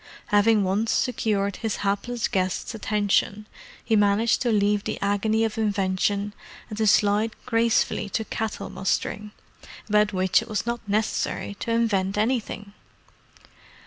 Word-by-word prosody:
Having 210 0 +4
once 200 +4 0
secured 205 -5 0
his 225 -3 -2
hapless 220 +4 -1
guest's 185 +3 -2
attention, 210 -1 0 0.4
he 225 - +2
managed 205 +2 +3
to 245 - +1
leave 205 -1 +2
the - - -3
agony 210 +2 +1
of 220 0 -3
invention 200 0 0 0.4
and 210 - -6
to 220 - +2
slide 210 +2 +3
gracefully 230 -3 +1
to 220 +3 -2
cattle 220 0 -4
mustering, 210 +2 -2 0.6
about 210 -1 +3
which 185 -1 +2
it - - -9
was 215 0 -2
not 235 0 -2
necessary 205 0 -1
to - - -5
invent 205 -4 +1
anything. 215 -3 -2
210 Hz, 135 wpm, -25 LUFS, 200-225 Hz, 0.6 s, Having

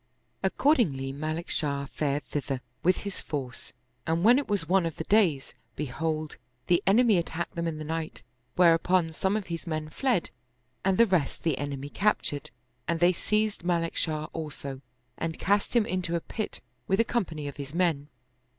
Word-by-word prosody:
Accord 295 0 +3
ingly 135 - 0
Malik 155 +4 -3
Shah 140 -2 0
fared 145 0 -1
thither 135 -3 -3 0.2
with 185 +1 +3
his 200 - -4
force 130 -5 -5 0.4
and 165 +2 +1
when 240 +5 +7
it 285 - -4
was 200 -6 0
one 185 -2 +3
of 165 - -5
the - - -4
days, 175 -9 +2 0.2
behold, 155 +2 -2 0.3
the 175 +1 +3
enemy 215 -1 +5
attacked 170 0 -3
them 170 0 -2
in 160 -2 -2
the 155 - -5
night; 160 +1 -4 0.3
whereupon 175 0 +4
some 190 +6 0
of 210 - -4
his 170 0 -5
men 155 -1 -2
fled 250 - 0 0.5
and 190 -1 +2
the 235 - +7
rest 180 -9 0
the 160 -4 +2
en 145 0 -2
emy 140 +1 -6
captured; 195 -8 0 0.4
and 170 -1 0
they 175 +2 +5
seized 210 +2 0
Malik 170 -1 0
Shah 155 -1 0
also 140 -4 -5 0.4
and 165 -1 -2
cast 205 +4 +1
him 230 -3 +5
into 185 -5 -1
a - - +2
pit 215 +6 -4 0.3
with 195 - +2
a - - +6
company 165 -11 -2
of 140 - -7
his 140 +2 -7
men. 165 -5 +1
165 Hz, 180 wpm, -28 LUFS, 150-190 Hz, 0.5 s, when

